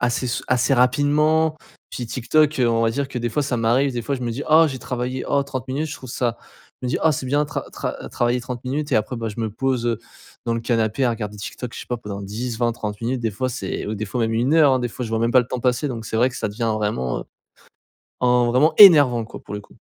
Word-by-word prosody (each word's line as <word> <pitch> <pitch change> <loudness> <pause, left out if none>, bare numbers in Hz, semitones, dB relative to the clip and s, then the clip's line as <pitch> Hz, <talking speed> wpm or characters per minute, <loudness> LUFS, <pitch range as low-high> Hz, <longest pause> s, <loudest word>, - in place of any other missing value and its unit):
assez 125 +1 0
sou 120 - -2
assez 130 +2 +3
rapidement. 150 +5 +3 0.3
Puis 120 - -5
TikTok, 150 +5 +1
heu, 125 -2 +3
on 115 0 +2
va 115 - +2
dire 140 +4 -2
que 135 -2 -5
des 120 0 -1
fois, 145 +5 -1
ça 125 -3 -1
m'arrive 125 +4 +2
des 120 -1 -3
fois, 140 +4 -2
je 125 - -7
me 120 -1 -2
dis: 140 +5 -4
«Oh 160 +1 +7
j'ai 130 -3 -5
travaillé, 125 +1 -3
oh 140 - +2
30 130 -2 -6
minutes 140 +4 -1
je 155 - -6
trouve 130 -3 -10
ça», 120 -2 -1 0.4
je - - -2
me - - -1
dis: - - 0
«Oh 160 - +5
c'est 130 -1 -4
bien 145 +3 +2
tra - - -4
tra - - -5
travailler 120 +1 0
30 125 0 -7
minutes.» 145 +3 -2
et - - +5
après, 110 +4 -1
bah, 115 -1 -3
je 105 - -9
me 110 -1 -2
pose, 130 +1 -1
heu, 115 -2 0 0.5
dans 115 - +1
le 115 - -2
canapé 115 +2 0
à 120 - +3
regarder 105 -2 -4
TikTok, 115 +4 -7
je - - -6
sais - - -10
pas, 120 - -2
pendant 100 -3 -7
10-20-30 115 0 -3
minutes 125 +2 -1
des 115 - -1
fois. 130 +6 -2
C'est 100 -6 -4
au 105 - -2
des 110 +1 -4
fois 120 +4 -3
même 115 0 +1
1 125 +7 +2
heure, 150 -4 +6
hein, 130 - +3
des 120 - -1
fois. 125 +2 -6
Je 110 - -6
vois 115 - 0
même 115 - +2
pas 130 - +7
le 120 - -4
temps 125 - -3
passer, 125 +3 +1
donc, 115 -3 -5
c'est 110 - -3
vrai 125 +3 +3
que - - -9
ça - - -2
devient 110 +2 -1
vraiment, 105 - -2
heu, - - -9 1.0
en 125 -1 +3
vraiment 150 +6 +4
énervant, 145 - +8
quoi, - - -10
pour - - -9
le 105 - -3
coup. - - -21
125 Hz, 280 wpm, -22 LUFS, 115-135 Hz, 1.0 s, énervant